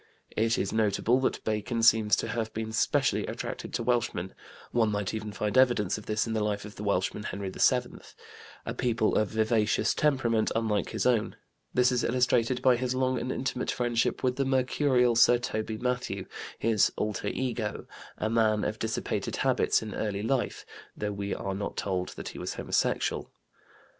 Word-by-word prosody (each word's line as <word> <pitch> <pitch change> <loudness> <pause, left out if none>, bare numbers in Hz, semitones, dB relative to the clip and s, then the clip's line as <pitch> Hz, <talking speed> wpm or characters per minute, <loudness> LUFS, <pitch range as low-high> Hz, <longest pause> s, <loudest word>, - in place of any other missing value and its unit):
It 115 +1 +2
is 100 - -1
notable 110 +3 +2
that 130 - -1
Bacon 110 +2 -1
seems 110 -3 +5
to - - -3
have 110 -1 -2
been 110 0 -3
specially 110 - +1
attracted - - -5
to - - -1
Welshmen 120 -7 -1 0.4
(one 115 -2 +2
might 105 -1 -2
even 110 -1 -4
find 105 +2 -2
evidence 120 -7 +4
of 110 - -14
this 110 0 0
in 115 - -3
the 110 -1 0
life 105 -1 -2
of 105 - -9
the 105 - -7
Welshman, 100 0 0
Henry 100 -1 -4
VII), - - +2 0.7
a 115 - -3
people 120 -3 +1
of 110 - +2
vivacious 110 0 +1
temperament 120 -7 +1
unlike 110 -2 0
his - - -2
own; 120 -4 +2 0.4
this 125 0 +3
is 125 -1 +1
illustrated 125 0 +1
by 130 -2 +5
his 125 +1 -1
long 130 0 +1
and 130 - -3
intimate 130 -1 -2
friendship 120 -1 0
with 125 -1 +1
the 140 - +2
mercurial 130 -2 +2
Sir 120 +1 +6
Toby 110 -2 -3
Mathew, 125 -6 -2 0.3
his 110 -2 +2
"alter 105 -2 -2
ego," 120 -5 -2 0.3
a - - -1
man 110 -2 +2
of 110 - -2
dissipated 110 0 -2
habits - - +2
in 110 - -6
early 105 -2 -2
life, 130 +2 -1 0.3
though 105 0 -2
we 100 0 -4
are 95 - -3
not 100 +1 -4
told 90 -2 -1
that - - -5
he - - -9
was - - -4
homosexual. - - -1
110 Hz, 180 wpm, -28 LUFS, 105-125 Hz, 0.7 s, Sir